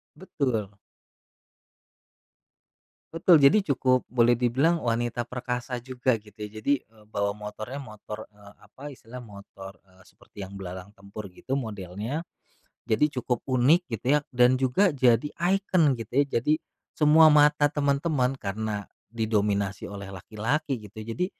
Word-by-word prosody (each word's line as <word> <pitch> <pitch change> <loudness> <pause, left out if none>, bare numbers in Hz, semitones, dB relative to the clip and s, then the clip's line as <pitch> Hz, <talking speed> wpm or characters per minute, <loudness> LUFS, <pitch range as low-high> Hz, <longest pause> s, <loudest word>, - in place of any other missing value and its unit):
Betul. 125 - -2 2.4
Betul. 165 -2 +5
Jadi, 190 +9 +5
cukup 130 -2 +2
boleh 120 -1 +3
dibilang 135 +8 +2
wanita 120 +1 -1
perkasa 125 0 -4
juga 130 0 0
gitu, 105 0 -19
ya. 110 +1 -10
Jadi, 140 +5 +2
eee, 110 -1 -22
bawa 100 -1 -1
motornya 110 +6 -7
motor, 105 -2 -9
eee, 105 -1 -17
apa 135 - -17
istilahnya, 125 0 -11
motor, 100 -2 -11
eee, 95 -1 -23
seperti - - -23
yang 100 - -12
belalang 95 +1 -8
tempur 100 +1 -10
gitu 135 +8 -3
modelnya, 110 - -4 0.7
jadi 115 +4 +2
cukup 125 -1 -2
unik 130 +7 +3
gitu 115 +1 -5
ya. - - +5
Dan 125 0 +4
juga 135 +8 +2
jadi 125 0 +3
ikon 175 - +2
gitu 115 0 -8
ya. - - -1
Jadi, 150 +7 0 0.3
semua 155 +1 +6
mata 150 -1 +5
teman-teman 140 -2 0
karena 105 0 -4 0.2
didominasi 105 -4 -1
oleh 100 -1 -8
laki-laki 125 - -2
gitu 105 - -19
ya, 110 - -11
jadi, 180 +11 -1
120 Hz, 135 wpm, -26 LUFS, 105-140 Hz, 2.4 s, semua